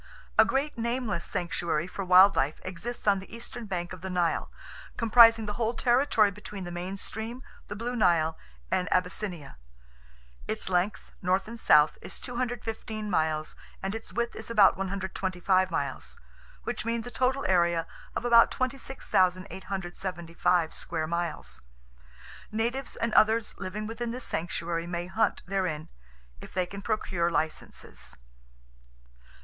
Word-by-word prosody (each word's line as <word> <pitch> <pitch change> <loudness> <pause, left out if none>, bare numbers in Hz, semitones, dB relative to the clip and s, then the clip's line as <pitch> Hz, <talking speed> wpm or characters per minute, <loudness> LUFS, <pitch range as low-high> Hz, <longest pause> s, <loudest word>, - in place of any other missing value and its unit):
A - - +7
great 275 -1 -1
nameless 235 -6 -1
sanctuary 170 -2 -1
for 195 +2 -5
wild 185 +2 +7
life 140 +3 +1
exists 195 +7 -5
on 200 -2 +4
the 190 - -12
eastern 230 0 -7
bank 175 -2 -3
of 185 - -9
the 190 - -5
Nile, 175 -2 0 0.5
comprising 230 -1 +7
the 210 - -3
whole 230 +2 -1
territory 240 -4 +3
between 205 -1 -8
the 175 - -6
main 180 +3 -4
stream, 225 +6 -5 0.2
the 205 - -5
Blue 240 +4 -3
Nile 170 -7 +3 0.4
and 180 - 0
Abyssinia. 180 - -1 0.9
Its - - -3
length 185 +3 0
(north 190 +1 +1
and 230 +1 -7
south) 150 -7 +5
is - - -8
215 225 -3 -4
miles, 155 -2 0 0.3
and 195 +1 -1
its 225 0 -6
width 235 0 -2
is 220 - -7
about 210 -4 +6
125 190 -1 0
miles; - - -3 0.5
which - - -3
means 230 0 -1
a 245 - -6
total 260 +2 +1
area 170 -2 +3 0.3
of - - -2
about 235 -1 +7
26,875 185 -8 -1
square 160 -2 -3
miles. 155 - -3 0.9
Natives 235 +5 -2
and 230 -1 -1
others 220 +1 +4
living 210 +3 -4
within 230 +2 -4
this 250 +2 -5
sanctuary 170 0 -2
may 175 0 -3
hunt 205 +5 0
therein—if 60 - -5
they 185 -1 0
can 200 +3 -8
procure 190 -6 0
licenses. 160 -2 -4
190 Hz, 135 wpm, -28 LUFS, 175-230 Hz, 0.9 s, A